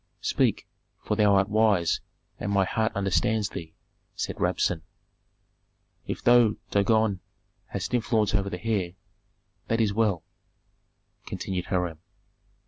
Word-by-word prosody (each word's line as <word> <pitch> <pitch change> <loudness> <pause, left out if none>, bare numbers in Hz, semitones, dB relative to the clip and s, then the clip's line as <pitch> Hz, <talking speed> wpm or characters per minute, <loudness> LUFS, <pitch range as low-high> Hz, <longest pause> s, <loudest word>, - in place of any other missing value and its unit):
"Speak, - - +1 0.4
for 105 - 0
thou 105 -2 +4
art 95 0 +3
wise 105 -6 +2 0.4
and 100 - -2
my 100 -1 +3
heart 110 +3 0
understands 100 +2 +1
thee," 80 -1 -8 0.4
said - - -3
Rabsun. 85 -3 +1 1.3
"If - - -4
thou, 120 -3 +5 0.2
Dagon, 105 -1 +2 0.5
hast - - -4
influence 110 -3 +1
over 100 -1 +1
the 90 +3 -7
heir, 100 -6 0 0.7
that 115 - +1
is 105 -3 +2
well," 105 -6 +1 1.0
continued 90 -2 -3
Hiram. 90 -4 -1
100 Hz, 120 wpm, -27 LUFS, 95-110 Hz, 1.3 s, thou